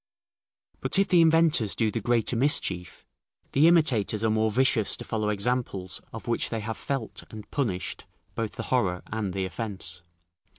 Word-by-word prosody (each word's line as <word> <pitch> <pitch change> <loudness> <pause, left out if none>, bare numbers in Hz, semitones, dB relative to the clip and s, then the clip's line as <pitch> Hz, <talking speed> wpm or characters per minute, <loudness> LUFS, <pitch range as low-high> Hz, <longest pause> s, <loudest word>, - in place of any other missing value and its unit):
But - - +1
if 195 - +3
the 175 -3 +6
inventors 160 -9 +3
do 110 -2 +1
the 115 - -3
greater 120 +2 +1
mischief, 95 -9 0 0.5
the 150 +4 +5
imitators 125 - +3
are 110 - +2
more 110 0 +2
vicious 120 -2 +2
to - - -8
follow 110 -1 -1
examples 100 -4 -1
of 110 - -9
which 115 - 0
they 115 -2 -3
have 110 +1 -4
felt 135 -6 -4
and 110 -1 -10
punished 105 -11 -2 0.3
both 115 -2 -3
the - - -5
horror 90 -8 +1
and 105 -3 -2
the 95 0 -2
offence. 95 -4 -5
110 Hz, 165 wpm, -27 LUFS, 100-125 Hz, 0.5 s, the